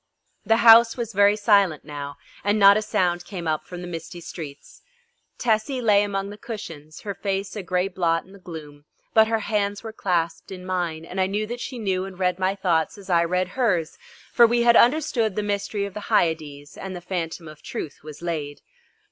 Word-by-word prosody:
The 225 +1 +5
house 230 +1 +8
was 230 -2 -4
very 200 +1 +5
silent 200 -8 +3
now, 145 -1 -6 0.3
and 205 +1 +2
not 200 -1 +8
a 215 - +2
sound 175 -4 0
came 175 -2 -6
up 155 -1 -1
from 180 -1 -7
the 180 - -6
misty 175 +1 -7
streets. 155 -4 -9 0.6
Tessie 235 +3 0
lay 210 -4 +4
among 200 -1 -2
the 205 - -11
cushions, 165 -10 -8
her 205 -2 -4
face 195 0 -3
a 210 - -3
grey 180 +1 0
blot 170 -3 0
in 190 - -18
the 200 - -14
gloom, 150 -5 -10 0.3
but 220 0 +6
her 225 0 0
hands 205 -1 -1
were 220 -1 -7
clasped 170 -5 -1
in 185 -1 -8
mine, 175 -3 -2
and 190 +3 -3
I 185 - +2
knew 205 +2 -1
that 240 +3 -6
she 255 +1 -6
knew 190 -4 -1
and 190 -2 -9
read 180 -1 0
my 190 +1 +1
thoughts 180 -1 0
as 195 -2 -8
I 170 -1 +4
read 180 +1 0
hers, 185 -8 0 0.3
for 235 -1 +7
we 235 +1 +2
had 235 0 +6
understood 240 -6 +3
the 210 - -1
mystery 205 0 -2
of 200 - -7
the 210 0 -7
Hyades 150 -3 0
and 190 -1 -6
the 175 - -7
Phantom 170 -2 -4
of 155 -1 -12
Truth 145 - -6
was 155 +1 -10
laid. 150 -4 -4
190 Hz, 205 wpm, -24 LUFS, 170-210 Hz, 0.6 s, house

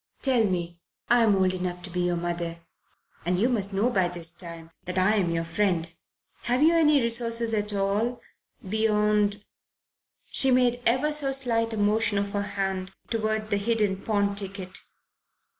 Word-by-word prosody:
Tell 255 -5 +3
me 175 -3 -3 0.3
I'm 230 -4 +5
old 185 -1 +2
enough 180 -1 -4
to 185 - -5
be 180 - -3
your 175 0 +1
mother, 170 -1 -3 0.6
and 180 +2 0
you 220 +6 +3
must 210 -6 0
know 205 +6 +1
by 190 -5 +2
this 170 -1 -3
time 165 -2 -9
that 180 +1 -3
I'm 190 -1 +2
your 165 0 -1
friend 165 -2 -1 0.5
have 250 +4 +2
you 325 +2 +5
any 305 -3 +4
resources 230 -1 +1
at 210 -1 +1
all 205 +5 0 0.5
beyond 210 -1 +1 0.4
?" - - -51
She 270 - +2
made 250 -1 +3
ever 260 +6 +2
so 285 -2 +1
slight 230 -4 0
a - - -3
motion 210 0 +1
of 200 0 -1
her 205 - -1 0.2
hand 190 -1 -2 0.2
toward 215 -1 -1
the 205 - +3
hidden 210 -1 +1
pawn 200 0 0
ticket. 195 -2 -6
205 Hz, 165 wpm, -26 LUFS, 185-230 Hz, 0.6 s, I'm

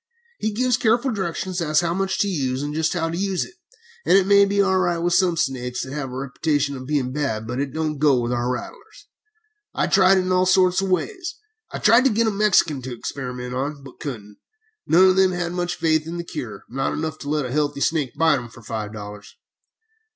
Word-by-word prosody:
He 215 - -1
gives 250 +3 +1
careful 240 +3 +2
directions 185 -2 -3
as 155 -2 0
to - - -2
how 170 - 0
much 190 +1 -1
to 205 - +1
use, 135 -7 -1
and 145 0 -4
just 160 +1 0
how 165 -2 -1
to - - -3
use 190 0 -1
it, - - -15 0.5
and - - +5
it 195 - +3
may 200 0 +6
be 200 0 -1
all 190 -1 +3
right 175 -2 +1
with 175 +1 0
some 175 -2 +3
snakes 125 -3 -2
which 130 - -8
have 145 -3 -4
the 125 - -8
reputation 140 +2 -1
of 130 -1 -8
being 140 -4 0
bad, 135 -7 -2
but 125 +3 -4
it 140 -1 -2
don't 155 0 -2
go 140 -4 +4
with 120 0 -2
our 120 0 0
rattlers. 415 - -8 0.7
I - - +1
tried 190 0 +5
it - - +3
in 185 0 -2
all 185 0 +3
sorts 185 0 +4
of 195 - -2
ways. 360 - -2 0.4
I - - -4
tried 240 +3 +5
to - - +6
get 230 0 +1
a 220 - +2
Mexican 195 -9 +2
to 125 -1 -6
experiment 125 -1 -5
on, 140 +2 -3
but 135 - -13
couldn't. 105 -9 -7 0.5
None 185 +3 +6
of 185 - +2
them 190 -1 +4
had 175 -1 -2
much 175 0 -2
faith 155 -1 +1
in 170 +1 -5
the 170 - -4
cure 120 -9 -7
not 135 +2 -2
enough 155 0 -4
to 145 - -6
let 150 -2 0
a 125 - -5
healthy 145 0 -1
snake 150 -6 0
bite 160 -4 +3
'em 120 -1 -9
for 115 0 -15
five 110 -1 -5
dollars. 105 -1 -9
160 Hz, 235 wpm, -22 LUFS, 130-185 Hz, 0.7 s, may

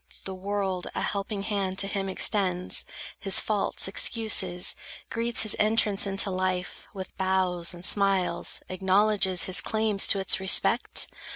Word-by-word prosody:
—the 190 - -6
world 190 -1 -4
a - - -3
helping 200 0 -4
hand 195 -2 -3
To 195 - +1
him 195 -1 -4
extends, 185 -2 0 0.3
his 195 -1 +3
faults 210 -3 0
excuses, 195 -4 +2 0.4
greets 230 +1 +1
His 215 - +1
entrance 210 -2 +2
into 195 0 +1
life, 185 -1 -4
with 190 -2 -10
bows 185 -2 0
and 175 0 -8
smiles 195 -3 0
Acknowledges 190 0 +1
his 180 -3 +3
claims 215 0 +1
to - - +3
its 190 - +2
respect? 190 +5 +2
195 Hz, 135 wpm, -25 LUFS, 185-205 Hz, 0.4 s, his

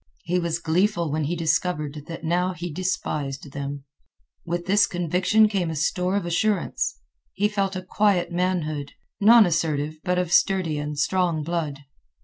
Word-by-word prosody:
He 180 +2 0
was 170 -1 -1
gleeful 170 0 +1
when 155 0 -1
he 170 +4 -1
discovered 155 -3 -1
that 165 -1 -7
he 160 - -5
now 180 +2 +1
despised 160 -5 -3
them. 140 0 -5 0.6
With 175 0 -3
this 205 +2 +4
conviction 180 +5 +2
came 195 -5 -1
a 160 - -3
store 180 +5 0
of 200 - -1
assurance. 180 - 0 0.4
He 205 +2 +1
felt 195 -2 -1
a 185 - -4
quiet 185 -2 +1
manhood, 170 -5 -1 0.3
nonassertive 165 -9 +4
but 180 -1 0
of 180 -2 -1
sturdy 180 -7 +2
and 150 0 -4
strong 170 0 +1
blood. 155 -4 -3
175 Hz, 150 wpm, -24 LUFS, 155-185 Hz, 0.6 s, this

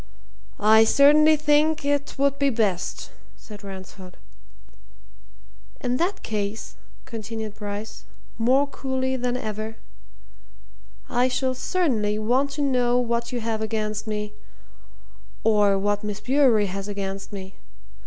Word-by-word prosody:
"I 220 +1 +6
certainly 300 +6 +6
think 305 0 +2
it 285 0 0
would 280 0 +1
be 280 -1 +3
best," 210 -7 -1 0.3
said 210 -1 -12
Ransford. 190 -1 -10 1.6
"In 250 0 -1
that 355 +6 -1
case," 210 0 -4 0.3
continued 220 -2 -6
Bryce, 205 +1 -7 0.3
more 260 +5 +4
coolly 265 -2 -2
than 250 -1 -1
ever, 215 -1 -5 1.3
"I 245 +1 +2
shall 260 0 0
certainly 250 - 0
want 250 +6 +1
to 290 0 -2
know 250 -3 +2
what 235 -1 -1
you 245 -1 -3
have 220 -1 -2
against 215 0 -2
me 210 -1 -3 1.1
or 210 -2 +4
what 205 +1 0
Miss 210 -1 -4
Bewery 255 -5 +3
has 195 +1 -5
against 195 -1 -5
me. 190 -1 -8
225 Hz, 120 wpm, -24 LUFS, 210-265 Hz, 1.6 s, I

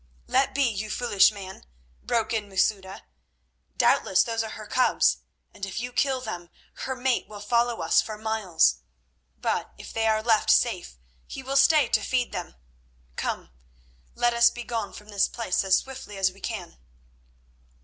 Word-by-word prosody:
"Let 265 +1 +1
be, 285 - +3
you 215 -4 -1
foolish 215 -3 +4
man," 195 -2 -9 0.4
broke 225 -1 -1
in 210 -2 -2
Masouda. 190 - -1 0.7
"Doubtless 190 - +4
those 225 -1 -2
are 220 - -4
her 215 0 -8
cubs, 255 +4 +2 0.4
and 205 - -16
if 195 0 -3
you 245 +1 -5
kill 265 0 +1
them, 175 -8 -6 0.4
her 265 - -2
mate 255 0 0
will 210 -1 -10
follow 235 +3 +1
us - - +4
for 215 -1 -7
miles; 205 - +1 0.6
but - - -1
if - - -10
they 225 0 +1
are 215 0 +2
left 225 -2 +2
safe - - +2 0.3
he 265 - -7
will 270 +1 -4
stay 295 +2 +5
to - - +2
feed 250 -2 -1
them. - - -6 0.6
Come, - - -4 0.6
let 240 0 +2
us 235 0 +6
begone 240 -1 -4
from 210 0 -13
this 200 -2 +2
place 220 -7 -1
as 190 -1 +4
swiftly 260 -6 -7
as 190 -1 +2
we 195 +1 -19
can." - - -6
220 Hz, 165 wpm, -26 LUFS, 200-245 Hz, 0.7 s, us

